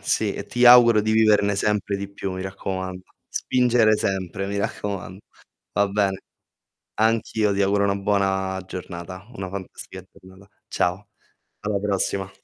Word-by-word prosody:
sì. - - 0
E - - -7
ti 120 +1 +1
auguro 120 -3 +8
di 110 +1 -1
viverne 105 -2 +3
sempre 105 -1 0
di 100 0 -5
più, 100 -1 -5
mi 95 - -5
raccomando. 95 -1 -5 0.3
Spingere 120 -4 +2
sempre, 95 -1 -2
mi 100 0 -3
raccoman 100 -3 -4 0.5
va 100 0 +2
bene. 100 -1 0 0.8
Anch'io 110 -1 +1
ti 100 - 0
auguro 100 +1 +2
una 100 0 +1
buona 95 -1 0
giornata, 90 +2 -8
una 95 -1 -5
fantastica 95 -1 -8
giornata. 95 +1 -17 0.2
Ciao, 90 +3 -1 0.5
alla 105 -1 -1
prossima. 95 -1 -1
100 Hz, 140 wpm, -23 LUFS, 95-105 Hz, 0.8 s, auguro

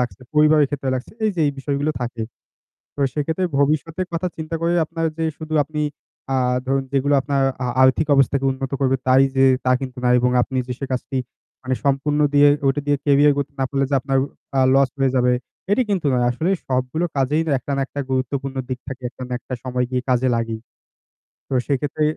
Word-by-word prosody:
লাগছে, 125 +1 -3
পরিবারের 150 -1 +5
ক্ষেত্রে 135 -2 -2
লাগছে, 125 - -5
এই 215 - +3
যে - - 0
এই 145 - 0
বিষয়গুলো 140 +2 -1
থাকে। 120 -2 -3 0.7
তো - - -32
সেইক্ষেত্রে 160 +5 -1
ভবিষ্যতের 155 +5 0
কথা 170 +2 -1
চিন্তা 160 +1 -5
করে 170 +1 +2
আপনার 165 +1 -2
যে 165 - 0
শুধু 155 0 -5
আপনি 150 0 -5 0.5
আ - - +3 0.3
ধরুন 135 +1 +1
যেগুলো 140 +1 +2
আপনার 140 0 0 0.2
আ - - 0 0.2
আর্থিক 130 +4 +4
অবস্থাকে 135 0 +2
উন্নত 135 0 -4
করবে 135 -1 +2
তাই 130 +1 +6
যে 135 - +5 0.2
তা 125 - +3
কিন্তু 130 -1 -6
না। - - +3
এবং 125 +1 +2
আপনি 130 +1 -2
যে - - -1
সে 135 - -2
কাজটি 130 +1 -2 0.4
মানে 130 0 -1
সম্পূর্ণ 140 +2 +1
দিয়ে 145 0 +7 0.2
ওইটা 135 +1 +2
দিয়ে 145 0 +3
ক্যারিয়ার 145 0 +5
গড়তে 140 -1 -2
না - - +2
পারলে 135 0 0
যে - - +2
আপনার 135 +1 -1 0.4
আ - - +5
লস 135 -1 +4
হয়ে 135 -1 +2
যাবে, 125 0 +3 0.4
এটি 210 +5 +4
কিন্তু 185 -6 0
নয়। 125 -1 +2
আসলে 155 +9 -1 0.2
সবগুলো 130 +6 -1
কাজেই 140 +4 +2
না - - 0
একটা 135 +3 -5
না - - 0
একটা 145 - -5
গুরুত্বপূর্ণ 135 +1 -2
দিক 130 -1 -3
থাকে, 130 -1 -7
একটা 130 - -11
না - - -6
একটা 130 - -6
সময় 125 -1 -1
গিয়ে 125 -1 -1
কাজে 125 +1 +2
লাগেই। 115 -1 -3 0.9
তো - - -21 0.2
সেইক্ষেত্রে 145 +2 -1
135 Hz, 205 wpm, -21 LUFS, 130-150 Hz, 0.9 s, দিয়ে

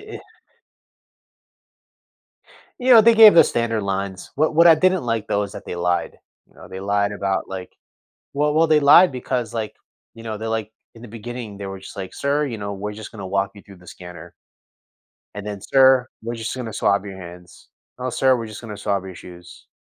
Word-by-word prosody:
it - - -9 2.6
You 255 +1 +2
know, 225 - +9
they 230 +1 +5
gave 220 -2 +9
the 170 - +8
standard 115 -2 -1
lines, 95 -1 -4
what 155 +2 0
what 170 +1 +6
I 165 - +8
didn't 185 0 +1
like, 115 -2 -2
though, 105 0 0
is 100 - -7
that - - -10
they - - -6
lied, 90 0 -2 0.3
you - - -29
know? - - -13
They 95 - -8
lied 100 +1 0
about, 100 -1 -2
like 95 -1 -8 0.6
well 150 +1 0
well, 165 +1 +4
they 155 -1 +3
lied 145 +3 +6
because, 125 -2 -3
like 110 -2 -4 0.4
you 115 - -12
know, 110 -1 -5
they're, 110 0 -5
like 110 -1 -3 0.2
in 115 - -15
the 120 - -10
beginning, 115 -2 -8
they 100 - -6
were 95 0 -7
just, 95 - -12
like, 95 -1 -7
"Sir," 145 +1 0
you 120 -4 -5
know, 100 0 -5
"we're 105 +1 -5
just 110 0 -10
gonna 100 -4 -8
walk 100 +1 -1
you 100 - -14
through 100 -2 -15
the 90 - -19
scanner." 90 0 -12 1.0
And 105 0 -7
then, 105 -2 -6
"Sir, 130 +1 +4
we're 115 +1 -5
just 115 +2 -5
gonna 115 -4 -6
swab 100 -1 +1
your 95 -1 -8
hands. 90 -1 -13 0.3
Oh, 130 0 -4
sir, 130 +2 +2
we're 115 - -6
just 110 +2 -10
gonna 105 -3 -8
swab 100 -1 -2
your 95 -2 -9
shoes. 90 0 -14
110 Hz, 210 wpm, -21 LUFS, 100-130 Hz, 2.6 s, know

